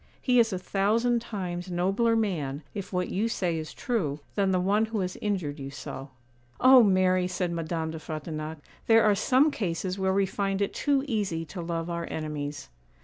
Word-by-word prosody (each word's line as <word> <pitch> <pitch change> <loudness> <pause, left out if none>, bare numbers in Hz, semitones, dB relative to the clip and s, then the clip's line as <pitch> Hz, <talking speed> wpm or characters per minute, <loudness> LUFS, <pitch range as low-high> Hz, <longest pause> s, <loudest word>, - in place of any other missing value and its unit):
He 250 -2 +3
is 225 -1 +4
a 185 - -1
thousand 225 +6 +1
times 185 -5 -5
nobler 195 +6 +2
man, 160 -10 -1
if 200 -2 -6
what 180 -1 -1
you 210 +5 0
say 175 -7 -1
is 155 - -6
true, 165 - -2
than 200 -2 +1
the 185 -1 +2
one 205 +4 +2
who 220 -2 -2
has 180 0 -3
injured 180 -8 -2
you 135 0 -5
so.' 135 -1 -7 0.5
'Oh, 260 0 +8
Mary,' 185 -3 +3
said 180 -1 -2
Madame 165 -1 -2
de 160 - -6
Frontignac, 155 0 -5 0.3
'there 225 0 +6
are 210 - +5
some 265 +8 +3
cases 185 - -2
where 190 0 +2
we 195 +1 +3
find 195 0 -1
it 200 - 0
too 280 -2 +1
easy 195 -9 -1
to 175 +3 -7
love 165 0 -3
our 170 -1 -3
enemies. 150 -2 -4
185 Hz, 190 wpm, -27 LUFS, 165-210 Hz, 0.5 s, Oh